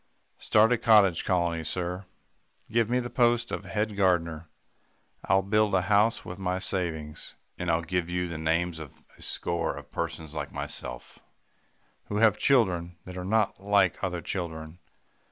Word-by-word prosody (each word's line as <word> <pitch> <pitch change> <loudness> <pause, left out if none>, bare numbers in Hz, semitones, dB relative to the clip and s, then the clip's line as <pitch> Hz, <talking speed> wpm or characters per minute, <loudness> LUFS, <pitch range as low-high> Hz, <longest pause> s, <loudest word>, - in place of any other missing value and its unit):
"'Start 110 +3 +4
a 120 - 0
cottage 105 -7 +5
colony, 85 -3 0
sir. 90 +4 -3 0.7
Give 115 -1 +2
me 125 +1 +2
the 120 -1 -5
post 120 -1 +2
of - - -4
head 105 0 -2
gardener. 85 -4 +1 0.8
I'll 95 +1 +3
build 105 0 +2
a 90 - +2
house 105 +3 +2
with 90 +1 -7
my 90 -1 -1
savings, 80 -5 -2 0.2
and 90 - -2
I'll 85 0 +2
give 90 0 -1
you 90 0 -1
the 85 -2 -5
names 80 +1 0
of 75 -4 -11 0.2
a - - -15
score 85 -1 -2
of - - -11
persons 80 -2 -4
like - - -4
myself - - -7 0.9
who 105 - -3
have 110 -2 +4
children 90 -10 +2
that 90 - -8
are 90 - -5
not 110 +2 +1
like 100 -3 +2
other 90 -2 -2
children. 80 -2 -5
90 Hz, 160 wpm, -28 LUFS, 85-105 Hz, 0.9 s, cottage